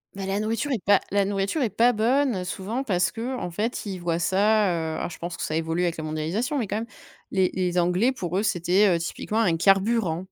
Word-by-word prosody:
Bah, 195 -1 -5
la 195 +1 -1
nourriture 225 +7 -1
est 225 -7 -2
pas, 200 0 +4
la 200 0 +2
nourriture 200 +8 -1
est 225 - +1
pas 235 +4 +4
bonne, 240 -2 +1
souvent, 210 +8 -3
parce 185 -6 +1
qu'en 235 -5 -4
fait, 215 +5 -3
ils 190 -2 -4
voient 170 -1 -1
ça, 205 +4 +3
heu- 160 -2 -2
alors - - -3
je - - -9
pense 170 0 -5
que - - -7
ça 155 - -2
évolue 165 +2 -1
avec 170 -2 -1
la 155 - -5
mondialisation, 170 - -2
mais 220 - -2
quand 205 - -3
même- 225 +1 -2 0.5
les 190 -2 +2
les 180 -1 0
Anglais, 180 +9 +2
pour 185 -7 -3
eux, 205 - +1
c'était, 190 +1 +3
heu, - - -1
typiquement 210 +6 -3
un 175 -7 +2
carburant. 195 -1 +2
195 Hz, 235 wpm, -25 LUFS, 175-220 Hz, 0.5 s, pas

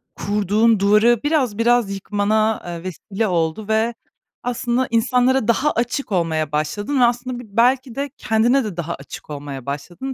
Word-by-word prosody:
kurduğun 210 +2 +2
duvarı 210 +4 +4
biraz 275 -9 +1
biraz 235 -3 +2
yıkmana, 215 +2 0
eee, 170 -1 -6
vesile 195 +4 -3
oldu 170 +3 -1
ve 220 +2 +1 0.5
aslında 245 +1 -1
insanlara 250 +1 +2
daha 275 +6 +2
açık 240 +1 -2
olmaya 160 -4 0
başladın 205 - -1
ve - - +5
aslında 245 +1 -1
bi 245 - -8
belki 250 0 +2
de 280 +1 -2
kendine 235 +5 +2
de 205 -6 -6
daha 170 0 -3
açık 140 +2 -11
olmaya 140 -3 -7
başladın. 175 - -5
220 Hz, 155 wpm, -20 LUFS, 185-245 Hz, 0.5 s, ve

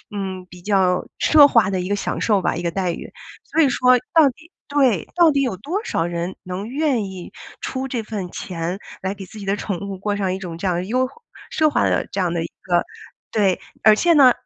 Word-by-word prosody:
嗯， 190 -2 -4
比 180 0 -13
较 185 -2 +2
奢 295 -2 +7
华 230 -7 +4
的 190 -1 -1
一 180 - -4
个 205 - +1
享 205 - -3
受 205 -4 +2
吧、 - - 0
一 175 - -4
个 170 - 0
待 185 -1 -1
遇。 - - -8 0.3
所 325 - +1
以 285 - +5
说 255 0 +4 0.2
到 315 -4 +6
底 325 +7 -14 0.2
对， 265 - +2
到 340 -2 +6
底 280 -1 +1
有 250 -7 0
多 340 - -3
少 - - 0
人 175 +1 -3
能 185 +3 -5
愿 270 -5 0
意 190 -2 -8 0.3
出 265 0 -3
这 245 -4 -3
份 205 -4 -5
钱 175 +1 -4 0.2
来 190 +1 -2
给 195 -1 -9
自 215 - -12
己 200 - -7
的 195 +1 +1
宠 200 -3 -4
物 200 -1 -5
过 205 +2 -2
上 195 -2 -1
一 - - -2
种 175 -4 -6
这 190 - -3
样 180 - +1
的 175 - -1
优 255 +5 +1 0.4
奢 310 -1 +3
华 285 - +1
的 - - +1
这 200 - -3
样 175 -2 0
的 170 -1 -1
一 - - -4
个 175 -2 +1 0.5
对。 200 -4 +2 0.2
而 215 -1 +7
且 340 +9 +3
呢， 275 -5 +7
200 Hz, 255 characters per minute, -21 LUFS, 185-260 Hz, 0.5 s, 奢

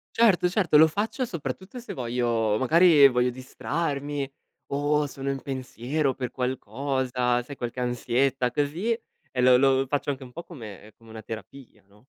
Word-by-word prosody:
Certo, 210 -6 +4
certo, 180 -6 +2
lo 160 +1 +8
faccio 215 - -2
soprattutto 185 - -6
se 240 - -7
voglio 120 -3 0
magari 155 +2 +6
voglio 125 -1 +1
distrarmi 140 +2 -3 0.4
o 145 +1 +1
sono 135 0 -5
in 135 -1 -3
pensiero 135 +2 -2
per 125 -1 -5
qualcosa, 125 0 -1
sai 140 +3 -10
qualche 120 +1 -5
ansietta 125 +1 0
così. 150 - -1 0.4
E 125 - 0
lo 125 0 +6
lo 135 0 +3
faccio 145 +1 -1
anche 135 -1 -4
un 125 -1 -10
po' 170 - -8
come 110 - -11
come 115 - -19
una 110 0 -9
terapia, 115 +4 -10
no? 105 +4 -24
135 Hz, 160 wpm, -26 LUFS, 125-150 Hz, 0.4 s, lo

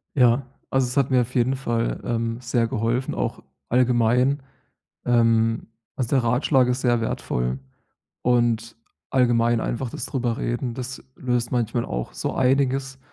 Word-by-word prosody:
Ja, 125 0 +4 0.2
also, 135 -1 +2
es 125 - -5
hat 140 -1 +2
mir 130 -1 +5
auf 120 +1 -5
jeden 125 +1 +2
Fall, 120 -3 -1
ähm, 115 -1 -1
sehr 120 -1 +1
geholfen, 115 +4 -1
auch - - -3 0.3
allgemein. 125 +2 +3 0.6
Ähm, 115 -2 +2 0.3
also, 125 -4 -2
der 130 - +3
Ratschlag 125 +2 +3
ist 125 +1 0
sehr 120 -2 +2
wertvoll 60 - -2 0.6
und 120 -2 +1 0.3
allgemein 120 -2 +3
einfach 120 +2 -2
das - - -5
drüber 120 -3 -1
Reden. 120 0 -2
Das 130 +2 -6
löst 125 -2 -1
manchmal 120 -1 0
auch - - -4
so - - -3
einiges. 135 0 +1
120 Hz, 145 wpm, -24 LUFS, 115-130 Hz, 0.6 s, mir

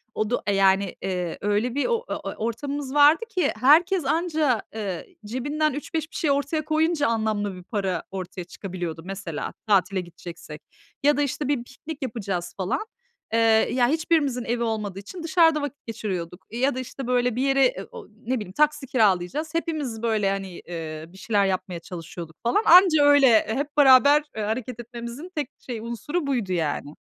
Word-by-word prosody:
Odu 215 +3 0
e, 200 -1 +1
yani, 195 0 +3
ııı, 180 -3 -2
öyle 210 +4 0
bir 285 - +1
o 475 0 0
ö - - -3
e - - -5
ortamımız 270 +5 -4
vardı 295 +8 +6
ki 365 -9 +1
herkes 325 - +5
anca, 305 - +1
ııı, 195 -6 -3 0.2
cebinden 290 +7 -1
3-5 315 +3 -4
bir - - -14
şey 300 - +1
ortaya 285 +2 0
koyunca 310 0 +1
anlamlı 215 -3 -1
bir 180 - -11
para 190 -4 -2
ortaya 185 -1 -6
çıkabiliyordu. 175 -2 -6
Mesela, 190 -5 -5
tatile 195 -2 +2
gideceksek 170 -3 -10 0.4
ya 290 0 +4
da, - - +2
işte, 285 0 -1
bir 280 -5 0
piknik 285 +4 -9
yapacağız, 195 -8 -3
falan. 190 - -1 0.5
Iıı, 225 -1 +4
ya 245 -1 +3
hiçbirimizin 300 -4 +1
evi 235 +1 -1
olmadığı 210 -4 -3
için 330 - -9
dışarıda 325 -2 +4
vakit 285 0 -6
geçiriyorduk 185 -6 -5
ya 250 +4 +1
da, 260 - -3
işte, 255 0 -6
böyle, 250 -1 +1
bir 250 - -1
yere, 275 - +3
ı - - -10
o 470 -3 -10
ne 230 +4 -4
bileyim, 210 -6 -5
taksi 300 +4 +1
kiralayacağız. 220 - +1
Hepimiz, 300 -9 -2
böyle, 215 -4 +1
hani, 195 -2 -4
ııı, 160 -1 -6
bir - - -14
şeyler 205 0 +1
yapmaya 185 -2 -2
çalışıyorduk, 170 -1 -9
falan. 240 - +2
Anca 350 -4 +7
öyle, 285 -1 +6 0.2
hep 280 +6 -3
beraber, 285 +1 +7
ııı, 215 - -1
hareket 240 +2 -3
etmemizin 240 +7 -8
tek 295 -2 -2
şey 240 -4 -6
unsuru 235 - -3
buydu, 235 -9 -1
yani. 150 -3 -2
235 Hz, 175 wpm, -24 LUFS, 195-290 Hz, 0.5 s, Anca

